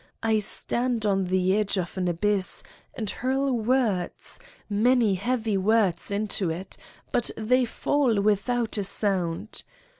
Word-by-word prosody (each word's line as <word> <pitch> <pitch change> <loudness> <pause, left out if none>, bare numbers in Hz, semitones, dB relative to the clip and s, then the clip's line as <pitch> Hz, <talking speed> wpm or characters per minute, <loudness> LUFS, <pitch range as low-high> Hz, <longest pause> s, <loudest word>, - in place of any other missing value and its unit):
I 220 -1 +2
stand 235 +2 +1
on 195 -2 +1
the 185 +1 +1
edge 210 -1 +1
of 180 -2 -3
an 185 -1 -1
abyss 190 +2 0 0.3
and 220 - -4
hurl 265 +6 -1
words, 225 - -1 0.3
many 225 +1 +3
heavy 220 +1 -1
words, 195 -3 +1
into 200 -3 -1
it, 180 +4 -5 0.4
but 240 - +1
they 250 +3 +2
fall 245 -1 +1
without 215 +2 0
a - - -1
sound. 195 -1 -1
210 Hz, 130 wpm, -26 LUFS, 190-235 Hz, 0.4 s, many